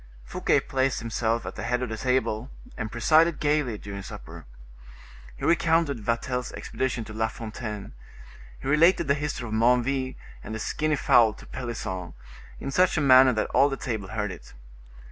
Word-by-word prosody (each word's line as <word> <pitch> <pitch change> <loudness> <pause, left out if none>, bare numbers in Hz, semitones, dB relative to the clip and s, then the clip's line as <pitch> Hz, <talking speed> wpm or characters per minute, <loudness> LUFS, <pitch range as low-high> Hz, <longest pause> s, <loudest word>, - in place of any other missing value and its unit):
Fouquet - - +1
placed 135 0 0
himself 115 0 -1
at - - -5
the - - -7
head 125 +1 -1
of 125 - -3
the 110 - -3
table, 125 -1 0 0.3
and 110 0 -5
presided 155 +8 +3
gayly 145 -6 +1
during 100 -1 -7
supper. 95 - -10 0.9
He - - -5
recounted 165 -5 +2
Vatel's 125 +3 -2
expedition 130 -3 -3
to 110 - -10
La 110 +1 0
Fontaine, 110 -2 -7 0.7
he - - -7
related 155 +4 +4
the 140 - +4
history 145 -4 -3
of 110 - -6
Menneville 125 +3 +2 0.3
and 110 - -6
the - - -4
skinny 155 +6 0
fowl 115 -5 +4
to - - -14
Pelisson, 95 - -5 0.4
in 135 - -4
such 180 +3 +3
a - - +3
manner 130 -2 +7
that 110 -1 -1
all 140 - +4
the 135 - -3
table 110 -6 -4
heard 105 -1 -3
it. 90 - -12
125 Hz, 170 wpm, -26 LUFS, 110-140 Hz, 0.9 s, manner